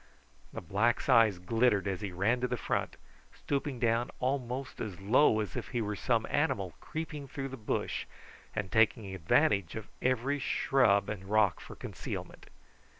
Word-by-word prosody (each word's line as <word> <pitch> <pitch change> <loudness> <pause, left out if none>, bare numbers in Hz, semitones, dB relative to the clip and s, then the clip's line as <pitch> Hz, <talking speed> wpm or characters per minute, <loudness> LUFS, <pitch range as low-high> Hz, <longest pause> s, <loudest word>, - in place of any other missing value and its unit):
The - - -6
black's 105 +7 +1
eyes 115 -6 +6
glittered 105 +2 +2
as 95 0 -2
he 100 -2 -4
ran 105 +8 +1
to 125 - +1
the 125 - -2
front, - - -2 0.3
stooping 140 -1 -3
down 120 0 +1
almost 130 0 -2
as 100 -5 -5
low 110 +3 +4
as 105 -5 -5
if - - -4
he 120 - -2
were 105 0 -2
some 115 +1 +1
animal 120 - 0
creeping 150 -3 -5
through 135 0 -5
the 135 - -6
bush, 110 -4 -2 0.5
and 105 -4 -3
taking 110 -3 +2
advantage 95 +1 +2
of 110 -2 -7
every 130 +3 +1
shrub 125 -6 +3
and 100 -3 -5
rock 105 -4 +3
for - - -10
concealment. - - -7
115 Hz, 160 wpm, -31 LUFS, 100-130 Hz, 0.5 s, eyes